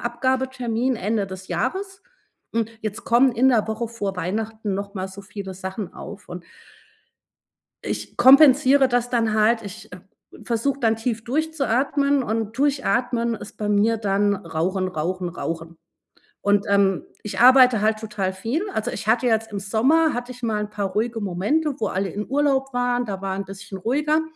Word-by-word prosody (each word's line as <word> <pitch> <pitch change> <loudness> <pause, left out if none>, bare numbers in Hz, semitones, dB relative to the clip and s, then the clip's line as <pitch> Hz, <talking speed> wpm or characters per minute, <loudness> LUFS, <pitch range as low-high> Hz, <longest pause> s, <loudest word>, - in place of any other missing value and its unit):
Abgabetermin 255 0 -1
Ende 205 +1 -1
des 190 0 -9
Jahres. 380 - -3 0.5
Hm, 230 -2 +1
jetzt 215 -1 -5
kommen 245 +2 +4
in 250 +3 +3
der 220 -3 +2
Woche 220 +2 -2
vor 205 -5 -4
Weihnachten 215 +3 -3
noch 200 +1 -5
mal 190 -1 -4
so 195 +1 -10
viele 195 -1 -7
Sachen 190 +1 -6
auf. 210 -2 -10
Und 175 -1 -7 1.4
ich - - -5
kompensiere 270 +1 +7
das 245 -1 0
dann 225 -3 +1
halt. 225 +2 +3
Ich, 200 -2 -10
äh, 180 - -9 0.4
versuche 250 +4 -1
dann 225 -2 +2
tief 225 -1 -3
durchzuatmen 280 -1 +1
und 220 0 -3
durchatmen 245 -4 +1
ist 205 - -11
bei 210 -1 -2
mir 215 +2 +3
dann 205 -1 +1
rauchen, 185 +1 -2
rauchen, 180 +1 -3
rauchen. 165 -1 -6 0.6
Und, 205 0 +2
ähm, 195 -2 +2 0.2
ich 210 - -5
arbeite 255 -3 +7
halt 215 0 +1
total 210 -4 -3
viel. 255 - -3
Also, 220 - -2
ich 215 - -6
hatte 245 +2 +3
jetzt 225 -1 +1
im 200 - -3
Sommer, 265 +11 +2
hatte 245 +1 -4
ich 250 0 -12
mal 215 -2 0
'n 210 - -6
paar 205 -2 -2
ruhige 225 +2 -1
Momente, 215 - 0
wo 215 - 0
alle 190 +1 -1
in 210 +6 -5
Urlaub 270 -2 +1
waren, 245 0 0
da 195 -2 -5
war 190 -1 -2
'n 195 - -3
bisschen 195 0 -9
ruhiger. 300 - +1
225 Hz, 170 wpm, -23 LUFS, 200-255 Hz, 1.4 s, kompensiere